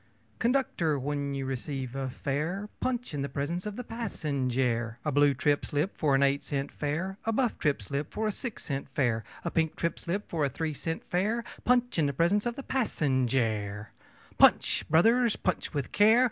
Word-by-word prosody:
Conductor, 230 Hz, -, +1 dB
when 140 Hz, +1 st, -2 dB
you 135 Hz, -1 st, -3 dB
receive 130 Hz, 0 st, -4 dB
a 135 Hz, -1 st, -2 dB
fare, 155 Hz, +10 st, -2 dB
Punch 245 Hz, -6 st, -2 dB
in 145 Hz, -, -2 dB
the 140 Hz, -, -2 dB
presence 160 Hz, +8 st, -2 dB
of 210 Hz, -, -5 dB
the 250 Hz, -, -5 dB
passenjare! 130 Hz, -, -1 dB
A 150 Hz, -, +1 dB
blue 145 Hz, 0 st, +4 dB
trip 145 Hz, -1 st, +2 dB
slip 150 Hz, +7 st, -1 dB
for 145 Hz, -4 st, +2 dB
an 135 Hz, -, +4 dB
eight 140 Hz, 0 st, +3 dB
cent 140 Hz, -1 st, -3 dB
fare, 170 Hz, +7 st, -3 dB
A 225 Hz, -, +2 dB
buff 240 Hz, 0 st, 0 dB
trip 145 Hz, -8 st, +1 dB
slip 140 Hz, +7 st, -3 dB
for 220 Hz, -, -1 dB
a -, -, +1 dB
six 235 Hz, +2 st, -6 dB
cent 140 Hz, -1 st, -4 dB
fare, 120 Hz, -5 st, +1 dB, 0.2 s
A 170 Hz, -, -1 dB
pink 160 Hz, -1 st, +1 dB
trip 170 Hz, -, -1 dB
slip 195 Hz, +4 st, -3 dB
for 160 Hz, -3 st, -1 dB
a 140 Hz, -, +2 dB
three 155 Hz, +4 st, -3 dB
cent 160 Hz, +4 st, -4 dB
fare, 215 Hz, +6 st, 0 dB, 0.2 s
Punch 245 Hz, -5 st, +3 dB
in 150 Hz, -, +3 dB
the 140 Hz, -, -1 dB
presence 190 Hz, -, +2 dB
of 240 Hz, -, -2 dB
the 275 Hz, -, -6 dB
passenjare! 120 Hz, -, 0 dB
CHORUS -, -, -27 dB
Punch, -, -, +5 dB
brothers! 225 Hz, +8 st, +4 dB
punch 185 Hz, -, -2 dB
with 140 Hz, -5 st, -3 dB
care! 220 Hz, +3 st, +6 dB
150 Hz, 195 wpm, -29 LUFS, 135-205 Hz, 0.2 s, care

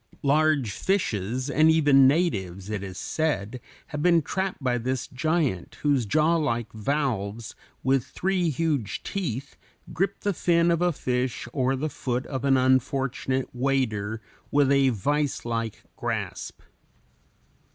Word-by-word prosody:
Large 145 Hz, -4 st, +3 dB
fishes, 125 Hz, -, -1 dB
and 155 Hz, +2 st, +4 dB
even 145 Hz, -4 st, +6 dB
natives, 100 Hz, -, 0 dB
it 105 Hz, -3 st, -2 dB
is 95 Hz, -2 st, -7 dB
said, 125 Hz, -3 st, -2 dB, 0.3 s
have 150 Hz, -, -4 dB
been 170 Hz, -1 st, +4 dB
trapped 190 Hz, +4 st, -2 dB
by 125 Hz, -2 st, +1 dB
this 130 Hz, +2 st, -2 dB
giant, 140 Hz, -, -1 dB
whose 140 Hz, -6 st, +2 dB
jawlike 150 Hz, -4 st, +1 dB
valves, 110 Hz, -3 st, -2 dB, 0.3 s
with 130 Hz, -1 st, +2 dB
three 180 Hz, +4 st, -1 dB
huge 150 Hz, -, -1 dB
teeth, 140 Hz, -, -4 dB, 0.4 s
grip 195 Hz, +3 st, -1 dB
the 205 Hz, -, 0 dB
fin 170 Hz, 0 st, +2 dB
of 170 Hz, 0 st, +1 dB
a 175 Hz, 0 st, +3 dB
fish 125 Hz, -5 st, -2 dB
or 130 Hz, -1 st, +1 dB
the 145 Hz, +4 st, -2 dB
foot 130 Hz, -3 st, -3 dB
of 130 Hz, -3 st, -4 dB
an 135 Hz, -1 st, +4 dB
unfortunate 130 Hz, 0 st, +1 dB
wader 115 Hz, -5 st, -1 dB, 0.3 s
with 140 Hz, -1 st, +3 dB
a 140 Hz, -1 st, +4 dB
vicelike 120 Hz, -2 st, -1 dB
grasp. -, -, -4 dB
135 Hz, 130 wpm, -26 LUFS, 120-155 Hz, 0.4 s, even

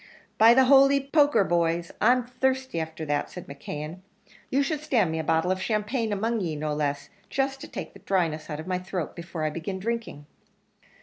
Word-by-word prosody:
"By 225 Hz, +2 st, +8 dB
the 265 Hz, -, +6 dB
holy 275 Hz, +1 st, +6 dB
poker, 290 Hz, -8 st, +5 dB
boys, 170 Hz, -1 st, 0 dB
I'm 245 Hz, +2 st, +4 dB
thirsty 260 Hz, -4 st, -1 dB
after 160 Hz, 0 st, -5 dB
that," 145 Hz, -1 st, -1 dB
said 180 Hz, -, -9 dB
McKeon; 150 Hz, +4 st, -7 dB, 0.5 s
"you 275 Hz, +2 st, +2 dB
should 300 Hz, +1 st, -2 dB
stand 235 Hz, -, +1 dB
me 160 Hz, -, -2 dB
a -, -, -2 dB
bottle 160 Hz, +3 st, +1 dB
of 185 Hz, 0 st, -1 dB
champagne 215 Hz, +2 st, -1 dB
among 225 Hz, +3 st, 0 dB
ye, 165 Hz, -4 st, -2 dB
no 150 Hz, 0 st, -2 dB
less 145 Hz, -1 st, -2 dB, 0.2 s
just 270 Hz, 0 st, -1 dB
to 310 Hz, -, -7 dB
take -, -, -7 dB
the -, -, -14 dB
dryness 165 Hz, -5 st, -1 dB
out 150 Hz, -1 st, -4 dB
of 160 Hz, -, -6 dB
my 185 Hz, -1 st, -1 dB
throat, 180 Hz, -3 st, -4 dB
before 170 Hz, -2 st, -6 dB
I 155 Hz, -, 0 dB
begin 170 Hz, +5 st, -4 dB
drinking." 225 Hz, -7 st, -4 dB
185 Hz, 195 wpm, -26 LUFS, 160-250 Hz, 0.5 s, By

